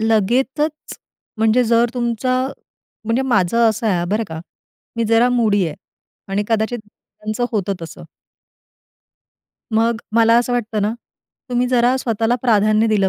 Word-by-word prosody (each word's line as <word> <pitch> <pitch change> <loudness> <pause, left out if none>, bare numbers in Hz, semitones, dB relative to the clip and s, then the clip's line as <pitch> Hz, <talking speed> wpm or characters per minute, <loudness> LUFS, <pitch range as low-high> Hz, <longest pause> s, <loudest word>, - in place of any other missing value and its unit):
लगेचच 255 +8 0 0.4
म्हणजे 225 +3 +3
जर 230 +1 +3
तुमचा 245 +1 0 0.7
म्हणजे 230 +4 0
माझं 230 -1 +2
असं 220 +1 -2
आहे 175 -4 +1
बरं 220 +2 0
का, 160 0 -6 0.6
मी 230 - 0
जरा 230 +2 +4
मूडी 210 -6 +2
आहे 155 - -5 0.6
आणि 205 +1 0
कदाचित 225 +2 0
त्यांचं 215 +3 -6
होतं 200 -2 -1
तसं. 165 - -9 1.7
मग 230 +1 +1
मला 230 0 +5
असं 245 +1 -1
वाटतं 220 -3 -1
ना, 210 +2 0 0.6
तुम्ही 245 0 +1
जरा 250 +1 +3
स्वतःला 230 -1 0
प्राधान्य 215 -1 +3
दिलं 205 -3 +2
225 Hz, 135 wpm, -19 LUFS, 215-240 Hz, 1.7 s, मला